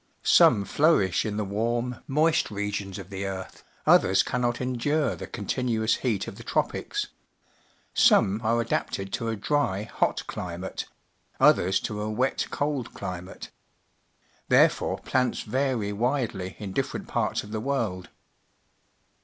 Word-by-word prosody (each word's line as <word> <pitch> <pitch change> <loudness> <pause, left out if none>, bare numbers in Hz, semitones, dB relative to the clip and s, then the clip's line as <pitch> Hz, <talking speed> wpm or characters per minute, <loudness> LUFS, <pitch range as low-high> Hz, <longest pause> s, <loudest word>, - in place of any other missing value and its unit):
Some 100 - +6
flourish 145 - +3
in 105 -1 -3
the 105 - -1
warm, 120 +5 -1
moist 155 +4 +2
regions 100 -2 -3
of 100 -1 -9
the 100 0 -3
earth; 95 -1 -7 0.2
others 95 +1 +5
cannot 120 -1 -1
endure 130 +3 0
the - - -7
contin 125 +3 -3
uous 110 -1 +2
heat 115 -7 -1
of - - -8
the - - -10
tropics. - - -1 0.8
Some 100 +3 +4
are 115 +2 +2
adapted 95 -4 -2
to 115 - -2
a 110 - -1
dry, 105 -3 0
hot 110 - -1
climate; 90 +1 -5 0.5
others 95 +2 +4
to 105 -1 -4
a 105 - -2
wet, 125 +5 0
cold 145 -4 -2
climate. 90 0 -7 1.0
Therefore - - +4
plants 125 -1 0
vary 120 -3 -1
widely 115 -5 -1
in 100 -2 -6
different - - -2
parts - - -1
of 105 - -11
the 110 - -2
world. 110 -9 -2
110 Hz, 135 wpm, -26 LUFS, 100-125 Hz, 1.0 s, Some